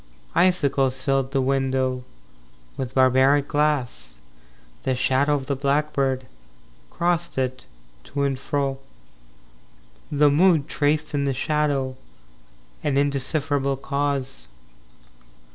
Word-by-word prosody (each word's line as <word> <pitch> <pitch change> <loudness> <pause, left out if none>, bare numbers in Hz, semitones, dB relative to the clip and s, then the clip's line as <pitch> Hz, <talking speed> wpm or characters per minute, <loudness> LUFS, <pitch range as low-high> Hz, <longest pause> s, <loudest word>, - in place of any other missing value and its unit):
VI - - +5
Icicles 135 -7 +1
filled 135 -1 +1
the 135 -1 0
window 130 -1 0 0.7
With 130 -1 -5
barbaric 130 +2 +4
glass. 130 - -1 0.6
The 130 - -1
shadow 135 +3 +2
of 135 -2 -3
the 140 - -1
blackbird 140 -1 0 0.6
Crossed 170 -2 -1
it, 130 -1 -2 0.4
to 140 0 -3
and 135 -2 -1
fro. 135 -1 -2 1.3
The 145 0 +4
Mood 160 -1 +4
Traced 150 0 0
in 140 -1 0
the 135 -2 0
shadow 140 -2 0 0.9
An 140 -2 0
indecipherable 140 0 0
cause. 140 -1 -3
140 Hz, 105 wpm, -23 LUFS, 130-145 Hz, 1.3 s, VI